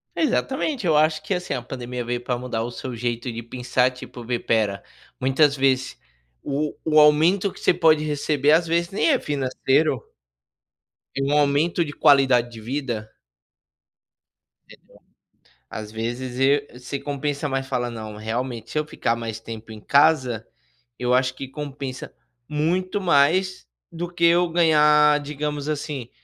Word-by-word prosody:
Exatamente, 275 - -1
eu 160 -3 +3
acho 155 0 +2
que 155 - -2
assim 180 -4 -3
a 125 - -3
pandemia 125 0 -6
veio 120 +1 -3
para 125 0 -2
mudar 120 -2 -3
o 120 - -5
seu 125 +1 -6
jeito 120 +1 -3
de 115 0 -6
pensar 125 +1 0
tipo, 125 -1 -10
vê 120 +1 -1
espera, 110 -4 0 0.4
muitas 135 +3 +3
vezes 135 -1 +1 0.5
o 145 +1 -2
o 155 -1 +4
aumento 160 +7 +4
que - - -14
você - - +3
pode 160 -3 +3
receber 150 -1 +1
às 165 +2 +4
vezes 170 +1 0
nem 200 - +1
é 265 - +3
financeiro 135 0 0 1.1
é 135 - -1
um 140 +2 +1
aumento 150 +4 +2
de 150 - -6
qualidade 135 -5 +4
de 115 -2 -11
vida. 120 -3 -4 1.6
Eh, - - -14 0.9
às 105 -1 -7
vezes 120 +3 -4
e 140 -1 +1
se 135 +3 -5
compensa 145 +1 -3
mais 135 0 -2
falar 125 -2 -1
não, 110 -2 -7
realmente 115 +1 -4
se - - -4
eu 150 - -2
ficar 115 - -1
mais 115 -2 -5
tempo 110 0 -9
em 110 - -9
casa, 130 -6 +2 0.5
eu 125 0 0
acho 130 0 +2
que 135 - -7
compensa 135 -2 -7 0.3
muito 175 +6 -1
mais 180 +3 +2 0.2
do 170 +1 -5
que 170 -1 +1
eu 175 +1 +4
ganhar, 150 -3 +4
digamos 150 0 -4
assim, 145 -5 -4
140 Hz, 155 wpm, -23 LUFS, 125-155 Hz, 1.6 s, o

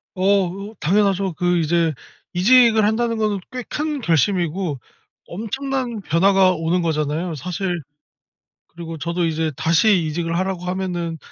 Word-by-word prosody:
어 195 +1 +3 0.3
으 - - -20
당연하죠. 195 +1 +1
그 175 +2 +1
이제 165 0 +2 0.4
이직을 225 +3 +5
한다는 230 +1 0
거는 210 -2 0
꽤 255 -1 -5
큰 300 +1 -3
결심이고 170 - 0 0.5
엄청난 240 +3 -3
변화가 190 +2 +3
오는 170 +1 0
거잖아요. 160 +2 -1
사실 175 +3 -3 0.9
그리고 165 -1 -8
저도 170 +2 -1
이제 160 -1 -1
다시 170 - +3
이직을 165 +2 -2
하라고 185 -1 -2
하면은 180 -3 -3
180 Hz, 290 characters per minute, -21 LUFS, 165-205 Hz, 0.9 s, 이직을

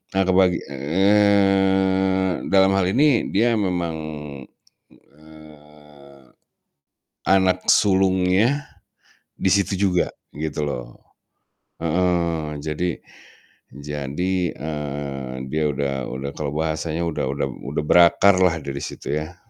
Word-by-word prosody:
Nah 95 - +3
kebagi 90 -2 +3
eee, 95 +3 +2
dalam 95 0 +5
hal 95 - +2
ini 140 0 +2
dia 115 +3 +3
memang, 90 -5 -1 1.0
eee, 75 -2 -18 1.0
anak 95 -1 +2
sulungnya, 95 +6 +2 0.7
di 95 - 0
situ 100 -1 +1 0.2
juga 90 -1 0 0.3
gitu 75 0 -3
loh. - - -5 1.0
Heeh. 85 -2 0
Jadi 80 +3 -2 0.8
jadi, 75 +5 -3 0.2
eee, 70 -3 -5 0.2
dia 80 0 0
udah 70 0 -2 0.2
udah, 65 +2 -5
kalau 75 -2 -3
bahasanya 80 +1 -2
udah 80 - -2
udah 70 0 -2 0.2
udah 75 +2 -2
berakarlah 90 +1 +4
dari 70 -1 -5
situ - - -6
ya. 80 +3 -8
85 Hz, 100 wpm, -22 LUFS, 75-95 Hz, 1.0 s, dalam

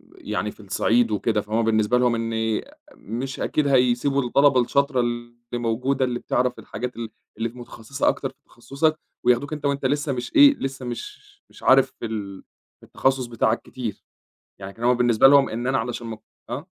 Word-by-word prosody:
يعني 105 0 -3
في - - -21
الصعيد 110 +3 +1
وكده، 105 0 0
فهُم 110 +2 -1
بالنسبة 110 +2 +2
لهم 125 -1 +2
إني 110 -1 -1 0.3
مش 130 +5 -6
أكيد 150 -2 0
هيسيبوا 130 +1 +2
الطلبة 130 +1 +4
الشاطرة 140 +2 +1
اللي 120 0 -2 0.2
موجودة 125 +3 0
اللي 120 -1 -3
بتعرف 125 0 -1
الحاجات 125 +4 -6
ال 115 -1 -5 0.3
اللي 115 +1 -1
في 125 - -16
متخصّصة 120 +3 -4
أكتر - - -2
في - - -21
تخصّصك، 155 +6 -1 0.3
وياخدوك 125 +5 +2
أنت 150 -1 -5
وأنت 140 -1 -1
لسه 145 +1 0
مش 125 -1 -6
إيه 285 -1 +8
لسه 135 -1 -5
مش 120 -1 -6 0.3
مش - - -17
عارف - - +5
في - - -4
ال 100 -3 -5 0.4
في - - -17
التخصص 135 -1 0
بتاعك 115 -1 0
كتير، 115 -6 -6 0.6
يعني 95 +1 -7
كان 115 +3 -8
هو 125 +1 +5
بالنسبة 120 0 +4
لهم 140 -1 +6
إن 120 +3 -4
أنا 135 0 +1
علشان 120 0 -4
م 110 -1 -5 0.3
آه. - - -5
120 Hz, 180 wpm, -23 LUFS, 115-135 Hz, 0.6 s, إيه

